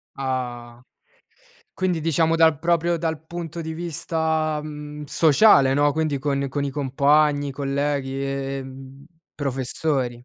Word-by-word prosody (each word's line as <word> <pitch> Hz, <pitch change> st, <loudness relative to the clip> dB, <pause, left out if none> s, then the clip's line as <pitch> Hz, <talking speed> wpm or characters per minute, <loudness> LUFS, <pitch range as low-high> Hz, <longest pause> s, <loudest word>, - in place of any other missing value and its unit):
Ah, 125 Hz, -3 st, -4 dB, 0.9 s
quindi, 180 Hz, -3 st, -1 dB
diciamo, 165 Hz, +1 st, +2 dB
dal 160 Hz, -3 st, +4 dB
proprio 170 Hz, 0 st, +1 dB
dal 160 Hz, -1 st, -3 dB
punto 170 Hz, 0 st, -6 dB
di 160 Hz, 0 st, -5 dB
vista, 160 Hz, -2 st, -1 dB
mhmm, 150 Hz, 0 st, -8 dB
sociale, 145 Hz, -3 st, +5 dB
no, 145 Hz, +1 st, +3 dB
quindi 155 Hz, -2 st, -1 dB
con 140 Hz, 0 st, -1 dB
con 140 Hz, +2 st, -3 dB
i 140 Hz, -, -2 dB
compagni, 145 Hz, +1 st, +2 dB
colleghi, 140 Hz, -1 st, -2 dB
ehm, 135 Hz, 0 st, -6 dB, 0.3 s
professori. 130 Hz, -2 st, -2 dB
145 Hz, 115 wpm, -23 LUFS, 135-160 Hz, 0.9 s, sociale